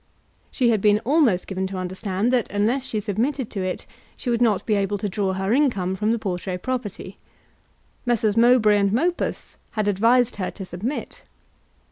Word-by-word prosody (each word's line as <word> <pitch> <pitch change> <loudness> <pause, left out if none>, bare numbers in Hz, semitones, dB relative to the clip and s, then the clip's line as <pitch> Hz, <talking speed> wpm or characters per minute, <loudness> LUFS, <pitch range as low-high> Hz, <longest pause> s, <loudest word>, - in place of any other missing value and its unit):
She 245 -3 +2
had 215 -3 +1
been 210 0 +4
almost 255 - +3
given 190 -1 -3
to 190 0 -6
understand 190 +5 -2
that 245 -4 +1
unless 235 +6 0
she 215 - -2
submitted 225 +5 -2
to 200 - -3
it, 185 0 -3 0.3
she 245 - -3
would 235 0 0
not 220 -5 +2
be 215 - +1
able 200 0 0
to 205 - -3
draw 195 -1 -1
her 190 +3 -1
income 230 -10 +1
from 210 +3 0
the 235 - +1
Portray 185 -3 -3
property. 205 -3 -5 0.8
Messrs. 225 -4 +1
Mowbray 230 -3 +5
and 200 -1 +2
Mopus 340 - -1 0.2
had 215 -2 -1
advised 230 +5 +3
her 185 -2 -2
to 195 - -8
submit. 200 - -5
210 Hz, 175 wpm, -23 LUFS, 195-240 Hz, 0.8 s, Mowbray